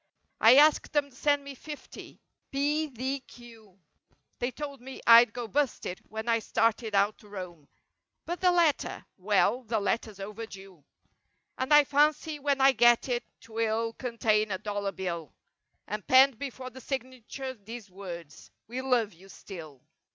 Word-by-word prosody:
I 225 +3 +8
asked 300 +3 +5
them 290 -1 +1
send 285 +2 +1
me 280 0 -8
fifty—^p 295 +3 -10 0.8
d 265 +4 -2
q— 235 -2 -14
37 195 -1 -26 0.6
They 245 - 0
told 280 -1 -7
me 265 +1 -9
Fd 230 0 +8
go 240 0 -5
busted 260 -8 -1
when 220 +2 -6
I 230 -1 +3
started 225 -1 0
out 200 +2 +2
to 210 - -17
roam— 180 -7 -8 0.6
But 345 +1 -4
the 365 -1 +5
letter? 335 -5 +1
Well—the 215 +4 +1
letter's 210 0 -2
over 210 +3 -6
due. 190 -6 -13 0.8
And 260 +3 -2
I 295 0 +8
fancy 295 +2 +1
when 280 -1 0
I 270 +1 +7
get 240 +1 +4
it 240 -1 0 0.2
'twill 225 0 -1
contain 220 -3 0
a 190 - -2
dollar 205 0 -3
bill; 170 -6 -5 0.5
And 210 -1 -6
penned 260 -2 +6
before 260 -2 -6
the 260 +2 -11
signature 260 0 -5
these 220 -2 -10
words— 175 -5 -9 0.2
"We 245 +3 -4
love 245 -6 +1
you—still." 170 -5 -12
230 Hz, 150 wpm, -29 LUFS, 205-265 Hz, 0.8 s, I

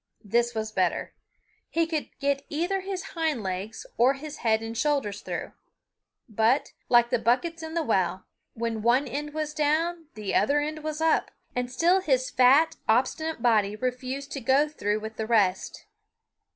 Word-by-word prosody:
This 235 +3 +1
was 220 0 -2
better. 185 -4 0 0.6
He 330 0 +1
could 320 -2 -3
get 280 -1 0
either 350 +6 -1
his 380 -1 -4
hind 315 - -1
legs 190 +3 -4
or 255 +4 +5
his 300 +2 -8
head 220 -1 +1
and 225 0 -5
shoulders 240 -7 0
through; - - -5 0.8
but, 225 +4 +1 0.2
like 240 0 +5
the 245 - +2
buckets 325 +9 +1
in 320 0 -6
the 335 - +1
well, 190 - 0 0.3
when 230 -1 -2
one 245 +5 +3
end 295 +2 -4
was 305 -1 -2
down 320 +3 0
the 210 -2 -4
other 285 - +3
end 305 +1 -4
was 310 0 -4
up, 320 0 +2 0.3
and 250 0 -2
still 345 +8 +3
his 260 -7 +1
fat, 270 +6 +5
obstinate 260 +4 +1
body 210 -4 +3
refused 255 +4 -4
to 275 - -3
go 270 +5 +3
through 215 -8 -2
with 220 0 -7
the 220 - -3
rest. 200 -5 +1
255 Hz, 165 wpm, -27 LUFS, 225-310 Hz, 0.8 s, or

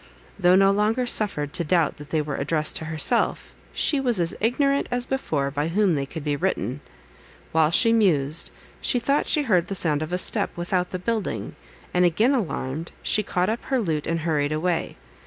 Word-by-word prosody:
Though 180 +1 +5
no 195 +1 +5
longer 215 +5 +1
suffered 195 -11 0
to 170 - +1
doubt 165 -1 +1
that 145 0 -11
they 155 -2 0
were 145 -2 -4
addressed 155 +2 0
to 160 - -6
herself, 155 0 +1 0.2
she 290 - +3
was 245 -7 +1
as 170 -1 0
ignorant, 275 +5 +1
as 245 0 -1
before, 150 - -2
by 145 +2 -2
whom 190 +2 +2
they 140 -2 -2
could 160 +1 -7
be 145 -1 -1
written. 145 - -2 0.7
While 160 -1 +3
she 230 +7 +4
mused, 160 -9 +2 0.3
she - - +1
thought 280 +4 0
she 300 - +2
heard 185 -9 +2
the 195 - -4
sound 155 -5 0
of 155 +2 -4
a 180 - 0
step - - 0
without 180 +1 -1
the 185 - -4
building, 215 +2 -3 0.4
and 180 - +3
again 210 - +3
alarmed, 165 - -3
she 215 - +2
caught 180 -3 -1
up 225 +2 -2
her 265 -1 0
lute, 160 -9 -2
and 165 0 -1
hurried 150 -3 0
away. 165 +2 -2
175 Hz, 195 wpm, -24 LUFS, 155-215 Hz, 0.7 s, Though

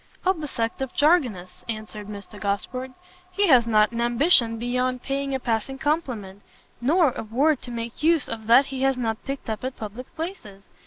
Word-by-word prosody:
"Of 370 -3 +2
the 300 - -3
sect 230 -1 -3
of 265 -2 -4
JARGONISTS," 255 - +2
answered 215 -2 -6
Mr 205 0 -9
Gosport; 230 +6 -2 0.4
"he 400 +3 +1
has 245 -5 +6
not 215 -1 +4
an 235 0 -2
ambition 240 -1 +4
beyond 250 +2 -1
paying 275 0 -2
a - - -1
passing 240 +2 -2
compliment, 250 - -2 0.4
nor 305 +3 +4
a - - -5
word 270 +7 +1
to - - -9
make 235 +1 -5
use 320 -2 +3
of 220 -1 -6
that 245 +4 +7
he 265 -1 -5
has 270 -1 +2
not 225 -2 -2
picked 275 0 -5
up 220 0 -4
at 260 0 -4
public 220 +4 -8
places. 315 - -6
245 Hz, 190 wpm, -24 LUFS, 220-275 Hz, 0.4 s, that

